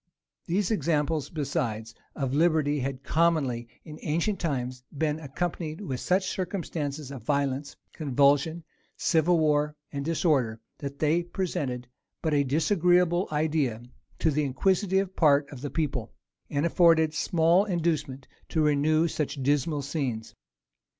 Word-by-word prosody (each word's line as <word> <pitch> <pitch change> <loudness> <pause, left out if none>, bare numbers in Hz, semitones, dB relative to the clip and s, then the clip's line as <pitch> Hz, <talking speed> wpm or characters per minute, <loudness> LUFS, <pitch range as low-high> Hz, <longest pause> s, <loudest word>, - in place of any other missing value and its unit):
These 195 +4 0
examples, 160 -6 0
besides, 115 -7 -3 0.2
of 135 -3 -2
liberty 155 -2 +2
had 135 0 -4
commonly, 145 -8 +1 0.2
in 155 -2 -10
ancient 170 +6 0
times, 130 -6 -3
been 155 +1 0
accompanied 160 +2 -4
with 135 -12 -4
such 185 +1 +1
circumstances 155 -7 -3
of 135 -3 -7
violence, 140 +2 -1 0.2
convulsion, 145 +3 +2 0.3
civil 170 +1 +3
war, 150 -1 +2 0.2
and 140 -1 -3
disorder, 140 -8 +1 0.2
that 140 -1 -6
they 155 +3 +2
presented 170 -9 -3 0.4
but 160 -2 +1
a 145 -1 +3
disagreeable 175 +4 +2
idea 150 -7 0 0.3
to 160 - +2
the 150 +1 +1
inquisitive 190 +7 +1
part 145 -3 +4
of 135 -4 -9
the 145 - -3
people, 135 -8 -2 0.4
and 145 +2 0
afforded 165 -2 +4
small 170 +4 +3
inducement 155 -8 -1 0.2
to 160 - +1
renew 155 +2 +3
such 145 -3 -3
dismal 145 +1 +1
scenes. 130 -7 -3
150 Hz, 130 wpm, -27 LUFS, 140-170 Hz, 0.4 s, part